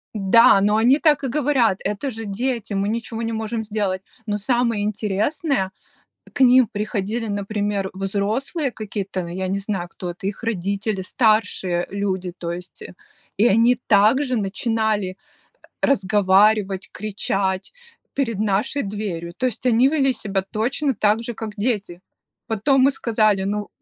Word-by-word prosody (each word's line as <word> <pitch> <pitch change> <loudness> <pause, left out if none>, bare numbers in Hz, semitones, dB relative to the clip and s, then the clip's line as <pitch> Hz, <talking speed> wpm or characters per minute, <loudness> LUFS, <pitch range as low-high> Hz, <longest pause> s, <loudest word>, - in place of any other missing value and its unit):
Да, 205 +1 +6
но 210 +1 +3
они 255 +6 +4
так 300 -3 +3
и - - 0
говорят: 255 -7 +2
"Это 210 +7 -2
же 225 0 -7
дети, 225 +1 -3
мы 195 +1 0
ничего 230 0 -3
не 225 - -2
можем 220 0 -3
сделать!". 205 -3 -2 0.2
Но 205 0 0
самое 230 -1 +1
интересное: 210 - -1 0.6
к - - -3
ним 255 -2 +6
приходили, 215 +2 -3
например, 205 -1 -2
взрослые 215 - -2
какие-то, 200 -4 -4
но 170 - -7
я 185 +2 -3
не 195 +2 -1
знаю, 195 -3 -3
кто 175 +1 -7
это, 185 +2 -6
их 205 +3 -5
родители, 200 -1 -2
старшие 195 -4 +1
люди, 190 -3 -2
то 170 -1 -4
есть, 180 +1 -8 0.5
и 220 - +5
они 235 +3 +4
также 240 +6 +4
начинали 215 -2 -1 0.7
разговаривать, 200 -3 +3
кричать 195 -2 -2 0.4
перед 230 -7 -1
нашей 215 +7 0
дверью, 195 -5 -4
то 255 - -1
есть 255 - -4
они 250 +2 +4
вели 275 -3 +2
себя 200 -4 -2
точно 255 +8 -1
так 210 +2 +2
же, 240 +1 -5
как 220 -1 -6
дети. 205 -5 -2 0.5
Потом 255 +5 +2
мы 275 - +6
сказали. 215 -6 +1
Ну 205 +1 -2
210 Hz, 145 wpm, -22 LUFS, 195-235 Hz, 0.7 s, Да